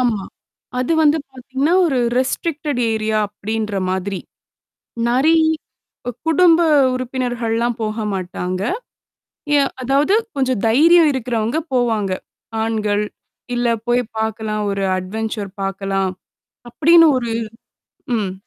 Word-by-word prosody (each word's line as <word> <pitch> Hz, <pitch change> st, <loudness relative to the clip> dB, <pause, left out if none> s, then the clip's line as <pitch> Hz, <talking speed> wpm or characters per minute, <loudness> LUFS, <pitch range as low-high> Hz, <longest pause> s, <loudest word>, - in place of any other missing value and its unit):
ஆமா. 230 Hz, -6 st, +1 dB, 0.6 s
அது 255 Hz, +6 st, 0 dB
வந்து 300 Hz, +1 st, +4 dB
பார்த்தீங்கன்னா, 265 Hz, +5 st, -1 dB
ஒரு 270 Hz, -5 st, +1 dB, 0.2 s
ரெஸ்ட்ரிக்டட் 290 Hz, 0 st, -1 dB
ஏரியா 220 Hz, 0 st, 0 dB
அப்பிடின்ற 210 Hz, 0 st, -4 dB
மாதிரி. 190 Hz, 0 st, -2 dB, 0.9 s
நெறை 285 Hz, +7 st, +4 dB, 0.7 s
அ -, -, +1 dB, 0.2 s
குடும்ப 335 Hz, +1 st, +5 dB, 0.3 s
உறுப்பினர்கள்லாம் 240 Hz, -2 st, -1 dB
போக 215 Hz, 0 st, -2 dB
மாட்டாங்க. 185 Hz, 0 st, -3 dB, 0.9 s
எ -, -, +5 dB, 0.2 s
அதாவது 275 Hz, +9 st, +2 dB, 0.2 s
கொஞ்சம் 260 Hz, -5 st, 0 dB
தைரியம் 320 Hz, +8 st, +6 dB
இருக்கிறவங்க 235 Hz, +1 st, -1 dB, 0.2 s
போவாங்க. 220 Hz, -6 st, +1 dB, 0.5 s
ஆண்கள் 210 Hz, -2 st, 0 dB, 0.5 s
இல்ல 240 Hz, 0 st, +1 dB, 0.2 s
போய் 245 Hz, +1 st, +2 dB, 0.2 s
பார்க்கலாம். 220 Hz, -1 st, -2 dB
ஒரு 195 Hz, 0 st, -2 dB, 0.2 s
அட்வன்சர் 210 Hz, +1 st, -4 dB
பார்க்கலாம். 195 Hz, 0 st, -1 dB, 0.6 s
அப்பிடின்னு 330 Hz, +5 st, +6 dB
ஒரு 235 Hz, -2 st, -3 dB, 0.9 s
ம். 200 Hz, -4 st, -2 dB
235 Hz, 100 wpm, -19 LUFS, 210-265 Hz, 0.9 s, தைரியம்